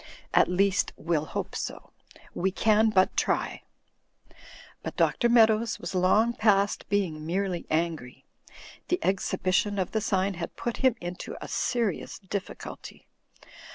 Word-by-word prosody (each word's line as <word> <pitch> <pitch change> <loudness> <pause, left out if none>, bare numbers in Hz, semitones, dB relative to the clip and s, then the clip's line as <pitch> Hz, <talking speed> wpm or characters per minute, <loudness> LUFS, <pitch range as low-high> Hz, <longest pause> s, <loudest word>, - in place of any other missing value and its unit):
At - - +5
least, 190 +2 +1
we'll 155 -1 -1
hope - - -4
so. - - -6 0.4
We 190 - 0
can 215 +3 +3
but 190 -3 +3
try." - - 0 1.2
But - - -6
Dr. 240 - +2
Meadows 225 -1 +4
was - - -6
xong 210 +6 +3
past 200 -2 +2
being 180 -7 0
merely 180 +2 -2
angry. 155 -6 -2 0.6
The 360 - +1
exhibition 190 +2 0
of 185 -2 -1
the 220 - 0
sign 195 -2 0
had 165 -2 -6
put 240 - -3
him 260 -3 +3
into 175 0 -6
a - - -7
serious 235 -5 -1
difficulty. 195 0 -7
195 Hz, 130 wpm, -27 LUFS, 180-220 Hz, 1.2 s, At